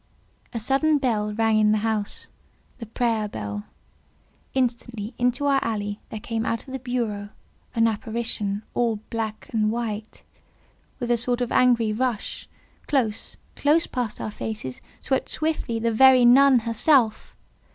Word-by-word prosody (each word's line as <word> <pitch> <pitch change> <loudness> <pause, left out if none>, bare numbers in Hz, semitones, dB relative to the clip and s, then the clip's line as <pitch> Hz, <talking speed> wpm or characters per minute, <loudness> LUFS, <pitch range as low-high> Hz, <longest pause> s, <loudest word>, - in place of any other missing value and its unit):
A 230 - -3
sudden 275 +6 +2
bell 220 -6 0
rang 220 0 +2
in 210 0 +4
the 215 - +3
house—the 220 +2 -6
prayer 225 -1 0
bell. 105 - -5 0.9
Instantly 240 -3 -2
into 250 +3 +1
our 275 -1 +3
alley 205 -2 -3
there 220 - -6
came, 225 +1 -3
out 230 -1 -2
of 260 - -8
the 265 - -3
berceau, 230 -5 -3 0.5
an 230 0 +4
apparition, 220 -2 -2
all 235 -2 +1 0.2
black 220 -2 -4
and 215 -1 +2
white. 220 -2 -4 0.8
With 240 -2 -1
a 240 - +4
sort 245 +1 -1
of 245 -1 -2
angry 235 -4 +3
rush 240 -2 -3 0.4
close, 225 -7 -1 0.2
close 305 +3 +3
past 245 -4 -3
our 215 - -4
faces—swept 215 - -4
swiftly 310 -7 -2
the 230 0 0
very 255 +1 +7
NUN 260 0 +7
herself! 230 0 +2
230 Hz, 140 wpm, -24 LUFS, 215-250 Hz, 0.9 s, very